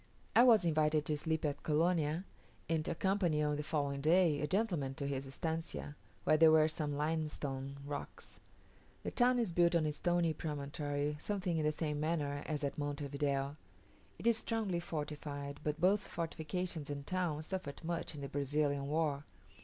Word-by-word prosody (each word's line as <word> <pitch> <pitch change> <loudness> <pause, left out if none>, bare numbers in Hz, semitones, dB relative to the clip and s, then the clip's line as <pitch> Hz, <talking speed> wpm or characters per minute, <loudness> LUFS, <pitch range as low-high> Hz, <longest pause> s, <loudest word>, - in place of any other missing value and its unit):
I 235 - +9
was 230 -7 +7
invited 155 -2 +2
to 150 - 0
sleep 160 0 -1
at 145 -1 -1
Colonia, 160 +1 +1 0.4
and 160 -1 +1
to - - -2
accompany 175 -4 +1
on 150 0 +1
the 150 - -2
following 145 -2 -1
day 160 -1 +4
a 150 - 0
gentleman 175 -9 0
to 140 - -4
his 135 -1 -2
estancia, 160 0 -4 0.3
where 155 - +4
there 160 0 +8
were 155 -1 +6
some 150 -2 -2
limestone 145 -3 -2
rocks. 145 0 -7 0.6
The - - -3
town 250 0 +4
is 230 -7 +1
built 170 0 +4
on 165 -2 +3
a 150 - +1
stony 175 +1 +1
promontory 145 -1 -2
something 190 -3 -1
in 155 -1 +1
the 150 - +3
same 150 -1 -2
manner 150 -2 -1
as 150 -2 -2
at 140 +1 -2
Monte 145 0 -2
Video. 140 0 -1 0.6
It - - -10
is 230 -1 +4
strongly 215 -7 -1
fortified, 145 -3 -5
but 150 +1 -1
both 195 +4 +4
fortifications 165 -1 -3
and 140 -1 -4
town 175 -4 -1
suffered 175 -5 -5
much 165 -1 -3
in 145 - -7
the 140 - -4
Brazilian 140 0 0
war. 150 -2 0
155 Hz, 175 wpm, -35 LUFS, 145-170 Hz, 0.6 s, I